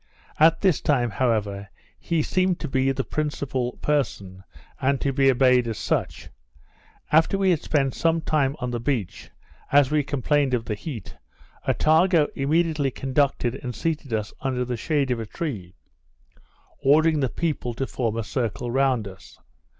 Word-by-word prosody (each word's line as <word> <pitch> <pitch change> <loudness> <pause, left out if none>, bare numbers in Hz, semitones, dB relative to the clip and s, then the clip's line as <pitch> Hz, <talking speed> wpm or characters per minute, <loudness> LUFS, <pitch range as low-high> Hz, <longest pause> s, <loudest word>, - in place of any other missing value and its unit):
At 160 +2 +5
this 185 -6 +2
time, 125 -6 +1
however, 100 -4 -1 0.3
he 165 -3 0
seemed 185 +1 +1
to 155 - -3
be 135 -1 +1
the 135 0 -2
principal 135 -5 -2
person, 100 -10 -1 0.4
and 135 0 +1
to 140 - -1
be 135 0 +4
obeyed 125 -1 +4
as 110 -2 -3
such. - - -2 0.8
After 160 +5 +4
we 195 -1 +3
had 165 - +1
spent 135 -4 0
some 165 0 +1
time 150 -4 0
on 125 -3 -4
the 120 - -2
beach, 115 -6 -3 0.4
as 140 -1 +5
we 150 -1 +3
complained 145 -1 +1
of 115 -2 -3
the 110 - -2
heat, 115 +2 -7 0.5
Attago 160 0 +3
immediately 150 0 +1
conducted 130 -2 0
and 125 -2 -5
seated 155 -1 -3
us 110 -1 -2
under 130 -2 -1
the 125 0 -3
shade 140 +2 0
of 120 - -1
a 110 - -5
tree, 105 - -5 1.1
ordering 155 +3 +4
the 135 -3 0
people 145 -7 -3
to 135 - -2
form 115 -4 -2
a 115 - -1
circle 115 +3 -3
round 130 -4 +1
us. 95 -1 -13
135 Hz, 160 wpm, -24 LUFS, 120-150 Hz, 1.1 s, At